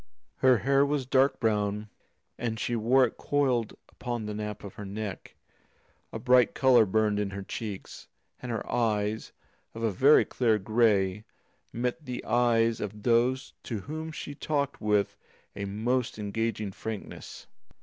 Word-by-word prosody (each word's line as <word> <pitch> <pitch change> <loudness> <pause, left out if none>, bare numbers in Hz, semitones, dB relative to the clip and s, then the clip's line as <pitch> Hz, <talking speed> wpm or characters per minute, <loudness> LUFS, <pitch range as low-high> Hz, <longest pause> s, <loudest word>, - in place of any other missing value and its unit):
Her 130 +2 +5
hair 140 +3 +3
was 140 -2 0
dark 135 +1 +3
brown, 105 -2 0 0.5
and 115 -2 -3
she 120 - -1
wore 125 +4 +4
it 115 - -6
coiled 130 -6 0
upon 120 -3 -5
the 105 - -4
nape 105 0 -5
of 100 - -8
her 105 - -8
neck; 100 0 -6 0.8
a - - -4
bright 125 +2 +4
colour 130 -7 +5
burned 105 +1 +2
in 105 -1 -1
her 100 0 -6
cheeks, 100 -1 -7 0.3
and 125 - -5
her 115 - -3
eyes, 110 -2 0 0.4
of 115 - -5
a 110 - +2
very 135 +10 +5
clear 115 -4 +2
grey, 105 -2 +2 0.5
met 125 +6 -2
the 125 -3 -6
eyes 115 -1 +2
of 105 0 -6
those 125 +3 +2
to 110 -5 -5
whom 155 +6 -6
she 150 -1 -6
talked 145 -1 -2
with 105 -1 +1 0.4
a 100 - -4
most 115 +5 -1
engaging 105 0 -2
frankness. 110 +1 -7
115 Hz, 150 wpm, -28 LUFS, 105-125 Hz, 0.8 s, Her